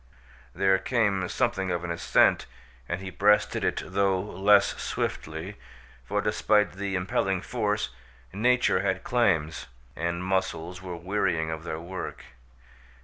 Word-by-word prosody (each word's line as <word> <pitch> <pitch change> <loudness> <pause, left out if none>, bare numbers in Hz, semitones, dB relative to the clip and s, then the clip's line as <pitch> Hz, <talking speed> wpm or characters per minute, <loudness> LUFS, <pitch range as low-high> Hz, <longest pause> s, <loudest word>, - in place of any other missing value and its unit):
There 95 0 +3
came 100 -7 +1
something 95 -1 0
of 85 -1 -1
an 90 - -3
ascent 85 0 +3 0.4
and 85 +2 -2
he 95 -1 -6
breasted 105 +2 +3
it, - - 0
though 95 0 +1
less 100 +3 +4
swiftly, 80 +6 -4 0.5
for, 105 +9 -1
despite 105 0 +2
the 100 0 -3
impelling 95 0 0
force, 105 - -1 0.4
nature 125 +5 +3
had 95 0 -1
claims, 80 -11 +1 0.3
and 85 +2 -2
muscles 90 -2 -2
were 90 -2 -6
wearying 85 -3 0
of 80 0 -5
their 80 -1 -4
work. 90 +3 -6
95 Hz, 130 wpm, -27 LUFS, 85-100 Hz, 0.5 s, less